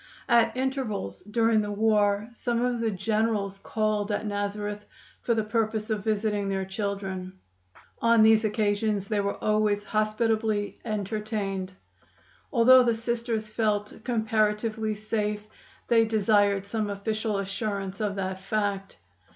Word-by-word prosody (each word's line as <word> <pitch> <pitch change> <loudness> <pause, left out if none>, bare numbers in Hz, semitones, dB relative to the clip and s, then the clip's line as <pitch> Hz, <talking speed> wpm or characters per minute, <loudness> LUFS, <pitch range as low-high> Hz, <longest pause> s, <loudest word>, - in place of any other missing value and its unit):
At 235 +1 +3
intervals 255 - -2
during 225 +1 +2
the 205 0 -3
war 205 -1 +2
some 240 0 -1
of 245 -1 0
the 230 -1 +1
generals 210 -1 -1
called 215 0 -1
at 205 - -1
Nazareth 205 0 -3 0.3
for 235 - +1
the 220 - +1
purpose 220 0 -1
of 210 -2 -1
visiting 210 -2 0
their 195 -1 -1
children. 190 -2 -4 0.7
On 230 -1 +5
these 220 0 +6
occasions 210 -1 0
they 210 0 0
were 200 0 -1
always 210 -1 +2
hospitably 215 -1 0
entertained. 210 -3 -3 0.8
Although 255 +1 +7
the 235 -2 +2
Sisters 230 -1 -2
felt 210 -1 -1
comparatively 220 -2 0
safe, 210 0 -2 0.4
they 230 -1 +4
desired 205 -2 +2
some 210 0 -2
official 215 +1 -2
assurance 195 0 -3
of 205 -2 -1
that 190 -1 -3
fact. 200 -1 -2
215 Hz, 125 wpm, -27 LUFS, 205-225 Hz, 0.8 s, Although